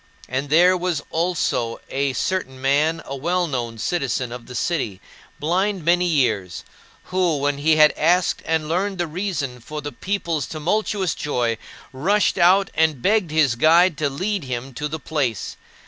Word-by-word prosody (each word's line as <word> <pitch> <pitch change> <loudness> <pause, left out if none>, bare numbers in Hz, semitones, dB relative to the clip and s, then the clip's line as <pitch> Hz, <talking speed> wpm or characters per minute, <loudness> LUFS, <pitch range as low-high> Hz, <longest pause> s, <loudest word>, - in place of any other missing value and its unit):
And 135 +2 -3
there 175 +5 +5
was 175 -4 -2
also 160 -9 -1
a 140 0 0
certain 130 -6 -2
man, 150 +5 +1
a 140 - -5
well 175 +6 0
known 120 -7 -3
citizen 130 -3 -1
of 120 -1 -8
the 125 - -9
city, 120 - -1 0.4
blind 185 +3 0
many 175 +1 +3
years, 110 - 0 0.4
who, 180 -4 0
when 140 0 -1
he 155 +2 +3
had 155 -1 +6
asked 175 +3 +2
and 160 -1 0
learned 190 +4 -1
the 175 - 0
reason 160 -7 -3
for 150 +6 -7
the 145 0 -6
people's 170 -7 -2
tumultuous 185 +3 -1
joy, 120 -6 -1 0.3
rushed 190 +10 +1
out 190 +3 +4
and 155 -5 +1
begged 210 -4 +2
his 150 -5 +3
guide 165 +7 +4
to 150 -2 +1
lead 190 +6 -2
him 130 +1 -5
to 150 +5 -3
the 160 +2 -5
place. 140 -8 -2
155 Hz, 165 wpm, -22 LUFS, 135-180 Hz, 0.4 s, had